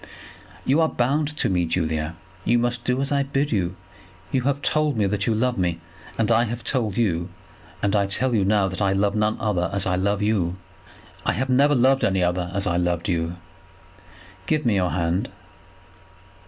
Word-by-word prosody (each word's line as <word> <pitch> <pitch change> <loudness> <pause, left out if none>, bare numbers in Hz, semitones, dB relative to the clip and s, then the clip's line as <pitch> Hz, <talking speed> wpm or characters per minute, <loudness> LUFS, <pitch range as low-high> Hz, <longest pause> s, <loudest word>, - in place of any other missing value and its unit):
"You 145 +5 +3
are 160 - +3
bound 145 +5 0
to - - +1
me, 90 -2 +1
Julia. 80 -1 -1 0.3
You 120 - +3
must 120 0 -1
do 125 +1 +1
as 140 - -3
I 140 -1 +2
bid 140 +1 -1
you. 95 -4 0 0.6
You 130 - +1
have 140 0 -2
told 155 -4 +1
me 105 - +2
that 100 +1 -1
you 115 - +2
love 125 0 0
me; 85 -2 0 0.4
and 110 -2 +1
I 120 - +4
have 120 +1 -5
told 110 -7 0
you, 90 -6 0 0.5
and 100 0 +2
I 100 -1 +2
tell 125 +6 +1
you 105 -4 +2
now, 100 0 +2
that 95 +2 -5
I 95 -1 +2
love 100 +1 +1
none 105 0 +1
other 95 -5 0
as 100 -1 +2
I 90 - 0
love 100 +3 0
you; 95 -5 0 0.7
have 130 +4 -1
never 140 +3 +4
loved 130 +2 +3
any 95 -2 +2
other 90 0 0
as 100 +1 0
I 85 - 0
have - - +1
loved 90 +2 -1
you. 85 -1 -1 1.1
Give 155 -2 0
me 115 - +3
your 90 -3 +1
hand." 85 +2 -1
105 Hz, 195 wpm, -23 LUFS, 90-125 Hz, 1.1 s, I